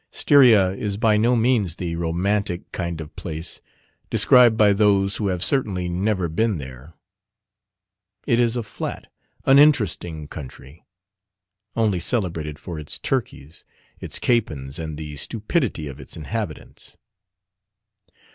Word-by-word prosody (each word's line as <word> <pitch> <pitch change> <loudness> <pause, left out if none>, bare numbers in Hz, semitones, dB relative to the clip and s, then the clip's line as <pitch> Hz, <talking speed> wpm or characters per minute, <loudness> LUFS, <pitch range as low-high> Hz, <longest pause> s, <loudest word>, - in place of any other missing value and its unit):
Styria 120 -10 +5
is 100 +1 -4
by 110 0 +3
no 115 +4 +3
means 115 -7 +1
the 85 -2 -4
romantic 90 +3 -2
kind 85 -3 -4
of 80 -1 -9
place 80 0 -6 0.5
described 120 -3 +5
by 105 -2 +5
those 100 -1 +2
who 105 - -1
have 90 -2 -1
certainly 100 -10 +2
never 95 +1 -1
been 105 +5 0
there. 65 +3 -10 1.3
It 120 - +2
is 120 0 +2
a 120 - -2
flat, 105 - -7 0.3
uninteresting 105 - +3
country, 70 +1 -11 0.9
only 110 -5 +1
celebrated 85 - -2
for 85 +1 -7
its 75 - -3
turkeys, 75 +5 -4 0.4
its - - -4
capons, 75 - -1
and 80 -2 -5
the 75 -2 -7
stupidity 110 - -2
of 70 0 -9
its 65 - -9
inhabitants. 85 0 -6
95 Hz, 125 wpm, -22 LUFS, 80-110 Hz, 1.3 s, Styria